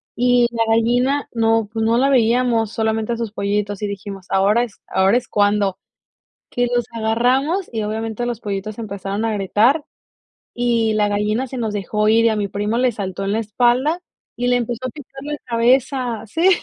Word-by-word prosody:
y 245 Hz, 0 st, +3 dB
la 230 Hz, -1 st, +1 dB
gallina 245 Hz, +5 st, +2 dB
no 225 Hz, -2 st, +1 dB
pues, 225 Hz, 0 st, -1 dB
no 230 Hz, +1 st, +3 dB
la 270 Hz, +3 st, +3 dB
veíamos, 235 Hz, -3 st, +2 dB
solamente 220 Hz, 0 st, -1 dB
a -, -, -3 dB
sus 230 Hz, -3 st, -3 dB
pollitos, 205 Hz, 0 st, -2 dB
y 210 Hz, -, -1 dB
dijimos: 200 Hz, -1 st, -7 dB
"Ahora 200 Hz, +5 st, +3 dB
es 235 Hz, -4 st, -9 dB
ahora 190 Hz, +4 st, +3 dB
es 250 Hz, -1 st, -4 dB
cuando", 205 Hz, -2 st, +1 dB, 0.7 s
que 245 Hz, 0 st, 0 dB
los 240 Hz, -1 st, +1 dB
agarramos, 250 Hz, -, +1 dB
y 220 Hz, -2 st, -2 dB
obviamente 220 Hz, +2 st, -3 dB
los 240 Hz, -2 st, -3 dB
pollitos 205 Hz, +1 st, -4 dB
empezaron 200 Hz, 0 st, -4 dB
a 225 Hz, -, 0 dB
gritar, 215 Hz, -, +2 dB, 0.7 s
y 235 Hz, -2 st, +1 dB
la 210 Hz, -1 st, +2 dB
gallina 210 Hz, +4 st, 0 dB
se 260 Hz, -, -7 dB
nos 225 Hz, -3 st, -2 dB
dejó 210 Hz, +1 st, -1 dB
ir 230 Hz, +1 st, +4 dB
y -, -, +5 dB
a 220 Hz, -, 0 dB
mi 205 Hz, -, -1 dB
primo 205 Hz, +3 st, -2 dB
le 255 Hz, 0 st, +2 dB
saltó 195 Hz, -3 st, -5 dB
en 200 Hz, -, 0 dB
la 220 Hz, -, +1 dB
espalda 245 Hz, -, +1 dB, 0.4 s
y 245 Hz, -, -1 dB
le 245 Hz, -, +3 dB
empezó 245 Hz, +1 st, -2 dB
a -, -, -4 dB
picar 270 Hz, 0 st, -11 dB
la 295 Hz, +1 st, -4 dB
cabeza. 245 Hz, 0 st, +1 dB
Sí. 330 Hz, -, +2 dB
225 Hz, 190 wpm, -20 LUFS, 210-245 Hz, 0.7 s, y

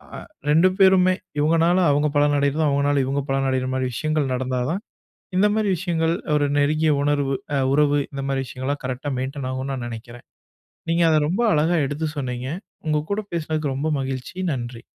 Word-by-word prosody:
அ -, -, -6 dB, 0.3 s
2 165 Hz, +5 st, +5 dB
பேருமே, 190 Hz, -1 st, +5 dB, 0.3 s
இவங்கனால 165 Hz, +4 st, +3 dB
அவங்க 145 Hz, +1 st, +2 dB
பலன் 145 Hz, 0 st, +3 dB
அடையறதும், 145 Hz, +2 st, +1 dB
அவங்கனால 140 Hz, 0 st, +2 dB
இவங்க 140 Hz, +1 st, -1 dB
பலனடையர 130 Hz, -1 st, 0 dB
மாரி 130 Hz, -1 st, 0 dB
விஷயங்கள் 150 Hz, +2 st, -1 dB
நடந்தா 130 Hz, 0 st, -1 dB
தான், 195 Hz, +4 st, -2 dB, 0.6 s
இந்த 210 Hz, +2 st, +5 dB
மாரி 210 Hz, -2 st, +1 dB
விஷயங்கள் 165 Hz, -2 st, 0 dB, 0.2 s
ஒரு 145 Hz, -1 st, +2 dB
நெருங்கிய 155 Hz, +2 st, +2 dB
உணர்வு 145 Hz, -2 st, +1 dB, 0.2 s
அ -, -, +2 dB
உறவு, 145 Hz, 0 st, +3 dB
இந்த 135 Hz, 0 st, -4 dB
மாரி 135 Hz, -1 st, 0 dB
விஷயங்கள்லாம் 135 Hz, +3 st, -4 dB
கரெக்ட்டா 130 Hz, +2 st, -3 dB
மெயின்டென் 135 Hz, 0 st, -4 dB
ஆகும்ன்னு 130 Hz, +1 st, -3 dB
நான் 120 Hz, -2 st, -4 dB
நெனைக்கிறேன். 120 Hz, +1 st, -10 dB, 0.6 s
நீங்க 170 Hz, +1 st, +2 dB
அத 155 Hz, -, +4 dB
ரொம்ப 185 Hz, +7 st, -1 dB
அழகா 160 Hz, +3 st, +2 dB
எடுத்து 150 Hz, +3 st, -3 dB
சொன்னீங்க. 125 Hz, -1 st, -3 dB, 0.4 s
உங்க 155 Hz, -1 st, +2 dB
கூட 210 Hz, -, 0 dB
பேசுனதுக்கு 155 Hz, -4 st, -2 dB
ரொம்ப 150 Hz, +3 st, -1 dB
மகிழ்ச்சி. 130 Hz, +5 st, -5 dB, 0.2 s
நன்றி! 120 Hz, -2 st, -5 dB
145 Hz, 170 wpm, -22 LUFS, 130-155 Hz, 0.6 s, 2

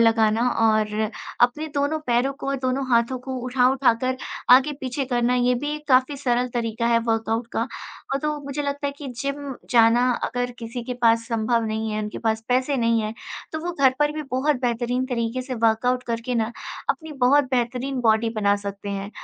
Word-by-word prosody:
लगाना 225 Hz, +1 st, +3 dB
और 215 Hz, -1 st, +2 dB, 0.4 s
अपने 245 Hz, +6 st, +3 dB
दोनों 285 Hz, +2 st, 0 dB
पैरों 245 Hz, +3 st, +2 dB
को 275 Hz, -, -8 dB
और 275 Hz, -, 0 dB
दोनों 260 Hz, +1 st, -1 dB
हाथों 235 Hz, +2 st, +2 dB
को 260 Hz, +1 st, -6 dB
उठा 250 Hz, 0 st, +3 dB
उठाकर 255 Hz, -1 st, +1 dB, 0.3 s
आगे 265 Hz, +4 st, +7 dB
पीछे 260 Hz, +1 st, -2 dB
करना, 245 Hz, -1 st, +1 dB
ये 250 Hz, 0 st, +3 dB
भी 290 Hz, +4 st, -2 dB
एक 300 Hz, 0 st, -9 dB
काफ़ी 260 Hz, +2 st, +3 dB
सरल 250 Hz, -2 st, 0 dB
तरीका 230 Hz, -1 st, -1 dB
है 235 Hz, 0 st, +4 dB
वर्कआउट 225 Hz, +1 st, 0 dB
का। 230 Hz, -, 0 dB, 0.5 s
अ, -, -, +3 dB
तो 300 Hz, 0 st, -1 dB
मुझे 280 Hz, +1 st, -3 dB
लगता 285 Hz, 0 st, -2 dB
है 280 Hz, -, -2 dB
कि 285 Hz, -, -6 dB
जिम 280 Hz, 0 st, -3 dB, 0.2 s
जाना 240 Hz, +1 st, +5 dB
अगर 245 Hz, 0 st, -2 dB
किसी 235 Hz, +1 st, -6 dB
के 250 Hz, -, -4 dB
पास 230 Hz, 0 st, +4 dB
संभव 230 Hz, 0 st, +1 dB
नहीं 220 Hz, 0 st, -2 dB
है, 215 Hz, 0 st, -2 dB
उनके 210 Hz, 0 st, -5 dB
पास 220 Hz, -1 st, -1 dB
पैसे 255 Hz, +3 st, +1 dB
नहीं 230 Hz, -2 st, +2 dB
है, 215 Hz, 0 st, -3 dB, 0.4 s
तो 315 Hz, -, -2 dB
वो 350 Hz, -, -1 dB
घर 270 Hz, -5 st, +3 dB
पर 295 Hz, 0 st, +2 dB
भी 305 Hz, 0 st, -4 dB
बहुत 265 Hz, +3 st, +1 dB
बेहतरीन 245 Hz, +1 st, 0 dB
तरीके 240 Hz, 0 st, -2 dB
से 255 Hz, 0 st, -5 dB
वर्कआउट 230 Hz, +2 st, +1 dB
करके 235 Hz, +2 st, -2 dB
ना, 230 Hz, 0 st, 0 dB, 0.4 s
अपनी 320 Hz, -2 st, -5 dB
बहुत 285 Hz, +3 st, +5 dB
बेहतरीन 250 Hz, +1 st, -1 dB
बॉडी 225 Hz, -1 st, +3 dB
बना 205 Hz, -1 st, +3 dB
सकते 200 Hz, 0 st, -5 dB
हैं। 200 Hz, 0 st, -4 dB
245 Hz, 195 wpm, -23 LUFS, 230-270 Hz, 0.5 s, आगे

